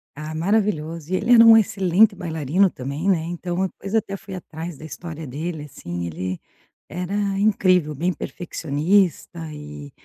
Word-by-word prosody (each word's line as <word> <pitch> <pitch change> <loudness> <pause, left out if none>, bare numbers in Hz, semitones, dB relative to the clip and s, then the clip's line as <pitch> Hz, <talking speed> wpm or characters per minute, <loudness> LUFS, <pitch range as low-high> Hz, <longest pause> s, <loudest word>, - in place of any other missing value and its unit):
Ah, 155 +1 -6
maravilhoso. 170 -4 -1
E - - +2
ele 230 +6 +3
era 230 -1 +9
um 225 0 +9
excelente 195 0 +3
bailarino 170 +2 +1
também, 140 +8 -3
né. 165 -4 +2
Então, 175 +2 -3
depois 195 +2 -7
eu - - +5
até 195 -2 -6
fui 195 -1 -9
atrás 165 -2 -7
da 155 - -10
história 160 0 -7
dele, 155 +4 -5
assim, 85 -11 -6
ele 90 +2 -4 0.5
era 180 +3 -5 0.3
incrível, 185 -7 +3
bem 175 +5 0
perfeccionista 170 +1 0
e 75 - -9
170 Hz, 155 wpm, -22 LUFS, 150-195 Hz, 0.5 s, era